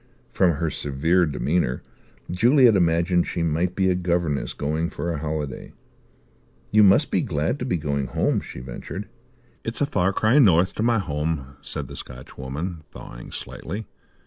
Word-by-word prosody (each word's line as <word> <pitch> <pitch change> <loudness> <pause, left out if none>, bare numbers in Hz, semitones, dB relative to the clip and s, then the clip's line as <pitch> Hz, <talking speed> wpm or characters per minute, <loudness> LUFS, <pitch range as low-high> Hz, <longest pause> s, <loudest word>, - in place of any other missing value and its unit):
From 90 -3 +3
her 80 +1 -1
severe 80 +6 +1
demeanour 75 -3 0 0.5
Juliet 120 +4 +5
imagined 85 0 +2
she 85 - -2
might 85 +3 0
be 95 -1 +2
a 95 - +4
governess 85 -5 -1
going 80 +3 -1
for 85 - -3
a 75 - -3
holiday. 75 -3 -4 1.0
"You 110 - +6
must 100 -2 +5
be - - +2
glad - - -1
to - - -3
be 90 - 0
going 70 -3 -2
home," - - 0
she 60 - -9
ventured. 65 +10 -7 0.6
"It's 115 - -4
a 145 - +3
far 95 -9 +1
cry 110 +8 +3
north 95 - +5
to - - -4
my 115 0 +3
home," 75 -6 -2
said - - -5
the - - -9
Scotchwoman, 70 +6 -6
thawing - - -10
slightly. 105 +2 -6
85 Hz, 160 wpm, -24 LUFS, 75-95 Hz, 1.0 s, You